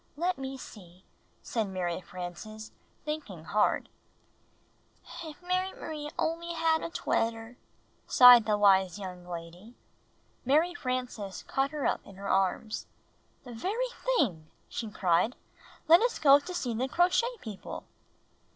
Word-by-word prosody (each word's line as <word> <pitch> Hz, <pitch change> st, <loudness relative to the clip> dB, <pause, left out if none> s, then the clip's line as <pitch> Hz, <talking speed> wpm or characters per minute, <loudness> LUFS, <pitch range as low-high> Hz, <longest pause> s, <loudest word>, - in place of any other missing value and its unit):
"Let 350 Hz, 0 st, 0 dB
me 270 Hz, 0 st, -5 dB
see," 185 Hz, -7 st, -13 dB, 0.4 s
said 225 Hz, -3 st, -1 dB
Mary 185 Hz, -2 st, -3 dB
Frances, 185 Hz, +5 st, -8 dB, 0.3 s
thinking 290 Hz, -, -5 dB
hard. 205 Hz, +6 st, +1 dB, 1.4 s
"If 320 Hz, +2 st, -10 dB
Mary 370 Hz, +1 st, 0 dB
M'rie 300 Hz, -2 st, -6 dB
only 335 Hz, +1 st, -2 dB
had 325 Hz, -1 st, +2 dB
a -, -, -4 dB
twetter!" 225 Hz, -6 st, -2 dB, 0.5 s
sighed 245 Hz, -3 st, +8 dB
the 210 Hz, -1 st, +2 dB
wise 190 Hz, -3 st, +4 dB
young 180 Hz, -3 st, -8 dB
lady. 175 Hz, +6 st, -9 dB, 0.7 s
Mary 310 Hz, +7 st, +3 dB
Frances 250 Hz, -, -4 dB
caught 270 Hz, +1 st, 0 dB
her 295 Hz, -2 st, -4 dB
up -, -, 0 dB
in 195 Hz, -, -14 dB
her 200 Hz, +1 st, -7 dB
arms. 195 Hz, +3 st, 0 dB, 0.6 s
"The 245 Hz, -2 st, -9 dB
very 420 Hz, -, -2 dB
thing!" 250 Hz, -, -1 dB, 0.2 s
she 225 Hz, -, -5 dB
cried. 195 Hz, +3 st, +1 dB, 0.5 s
"Let 335 Hz, +4 st, +8 dB
us 480 Hz, +1 st, +1 dB
go 280 Hz, -1 st, +7 dB
see 290 Hz, -6 st, -4 dB
the 250 Hz, +4 st, -1 dB
Crochet 365 Hz, -, +2 dB
People." 210 Hz, -4 st, -7 dB
240 Hz, 130 wpm, -29 LUFS, 195-320 Hz, 1.4 s, sighed